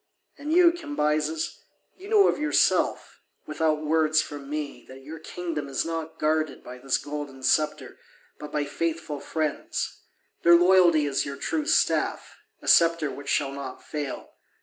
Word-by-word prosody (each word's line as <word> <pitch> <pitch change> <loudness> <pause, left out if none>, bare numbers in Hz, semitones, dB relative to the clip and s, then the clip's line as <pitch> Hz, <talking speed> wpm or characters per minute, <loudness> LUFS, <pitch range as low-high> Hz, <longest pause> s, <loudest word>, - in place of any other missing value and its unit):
And 290 +2 -6
you, 345 0 +6
Cambyses, 160 - -2 0.4
you 390 +2 -12
know 420 -3 +6
of - - 0
yourself, 300 0 +1 0.3
without 155 0 -1
words 155 0 +3
from 145 -2 -5
me, 150 -1 -5
that 130 +1 -12
your 155 +3 -9
kingdom 160 -3 -5
is 135 +2 -2
not 165 -1 -5
guarded 155 -1 -1
by 125 0 -10
this 135 +1 0
golden 145 -2 -7
sceptre, 150 +2 0 0.4
but 150 0 -8
by 150 -1 -1
faithful 160 -1 -3
friends; 155 -1 -3 0.4
their 170 0 +7
loyalty 175 -3 +5
is 140 -2 0
your 140 -1 -6
true 300 - -2
staff, 330 - 0 0.2
a - - -10
sceptre 165 -3 +4
which 140 0 -8
shall 140 -2 +1
not 140 -2 -8
fail. 145 -3 -6
155 Hz, 150 wpm, -26 LUFS, 145-170 Hz, 0.4 s, their